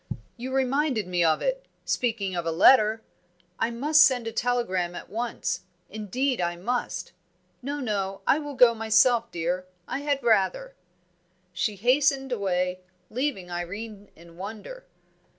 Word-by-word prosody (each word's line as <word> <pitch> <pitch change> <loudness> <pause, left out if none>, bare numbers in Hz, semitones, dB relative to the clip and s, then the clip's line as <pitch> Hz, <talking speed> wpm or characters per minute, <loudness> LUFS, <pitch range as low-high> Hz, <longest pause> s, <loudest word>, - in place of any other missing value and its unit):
"You 250 +2 -6
reminded 270 -2 +1
me 180 -1 0
of 160 -1 +2
it - - -2 0.2
speaking 215 -6 -1
of 175 - -1
a 165 - -1
letter; 215 +5 +5 0.6
I - - +1
must 295 +6 +3
send 250 -3 +3
a 225 - -3
telegram 205 -8 -1
at - - -9
once 235 +2 -3 0.3
indeed 225 +4 -1
I 175 0 -1
must. 240 +8 -3 0.5
No, 285 +3 -4
no, 200 -6 -2
I 290 - +3
will 290 -2 -6
go 245 -2 +6
myself, 225 +1 +3
dear. 175 +2 -2 0.2
I - - -3
had 285 -2 -1
rather!" 235 - +1 0.8
She 205 +4 -1
hastened 270 +5 +2
away, 185 -4 -1 0.3
leaving 245 -8 -2
Irene 200 +4 -6
in 170 0 -16
wonder. 220 - -8
225 Hz, 140 wpm, -26 LUFS, 185-260 Hz, 0.8 s, go